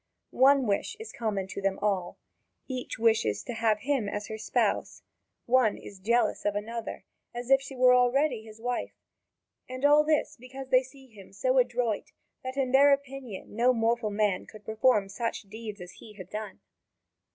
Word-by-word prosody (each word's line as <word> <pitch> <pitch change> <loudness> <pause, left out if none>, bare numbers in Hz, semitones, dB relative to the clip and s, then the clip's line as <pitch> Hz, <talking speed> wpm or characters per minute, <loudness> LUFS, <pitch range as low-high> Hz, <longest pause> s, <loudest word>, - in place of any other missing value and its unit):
One 270 0 +5
wish 205 - -1
is 445 0 -9
common 210 -5 -2
to 200 - -6
them 195 0 0
all 190 -4 -1 0.5
each 255 -2 -5
wishes 220 - +2
to - - -5
have 225 -2 +1
him 265 -7 0
as 205 +1 -5
her 220 - -5
spouse. - - -1 0.4
One 245 -3 +3
is 200 - -11
jealous 235 +5 +1
of 205 -1 0
another, 230 +2 -5 0.3
as 240 +2 -5
if 270 0 +6
she 270 0 -9
were 250 0 +6
already 250 0 +3
his 220 0 -13
wife; 245 +1 -3 0.7
and 255 +2 -3
all 295 +1 +6
this 305 -1 +1
is - - -17
because 260 +2 -9
they 255 -1 +5
see 265 +1 -15
him 210 -6 -15
so 255 +7 +1
adroit 245 -3 -1 0.3
that 260 +1 -5
in 260 -2 0
their 280 +2 +6
opinion 275 -8 -3
no 245 +3 +4
mortal 230 -1 +1
man 205 -2 0
could 215 -1 -14
perform 220 -2 +2
such 230 +4 -3
deeds 215 +1 -8
as 180 0 -9
he 215 - -14
had 185 -2 -11
done. 210 -2 -6
235 Hz, 180 wpm, -28 LUFS, 210-260 Hz, 0.7 s, if